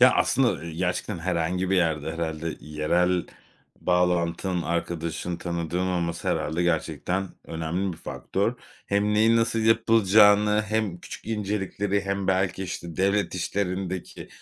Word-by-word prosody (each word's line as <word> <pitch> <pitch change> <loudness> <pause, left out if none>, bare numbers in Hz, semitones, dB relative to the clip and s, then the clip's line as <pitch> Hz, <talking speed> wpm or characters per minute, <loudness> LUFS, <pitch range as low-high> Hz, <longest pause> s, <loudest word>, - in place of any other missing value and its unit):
Ya, 125 0 +8
aslında, 135 -3 +3
ııı, 85 -4 -3
gerçekten 90 +1 -2
herhangi 90 +1 -1
bir 95 - +3
yerde 80 -3 +1
herhâlde 80 -1 -3
yerel 85 +4 +1 0.5
bağlantın, 90 0 +1
arkadaşın, 85 0 -2
tanıdığın 85 +1 -2
olması 85 -2 -1
herhâlde 80 +4 0
gerçekten 90 +2 -1 0.2
önemli 85 +4 -2
bir 80 - -9
faktör. - - -2 0.3
Hem 100 +1 +1
neyin 110 +2 +5
nasıl 115 0 +1
yapılacağını 105 -2 +5
hem 110 -5 -1
küçük - - -9
incelikleri 100 -2 -1
hem 100 0 -2
belki, 95 0 +1
işte, 85 -3 -6
devlet 100 +1 +1
işlerindeki 95 0 -3
90 Hz, 125 wpm, -26 LUFS, 85-100 Hz, 0.5 s, Ya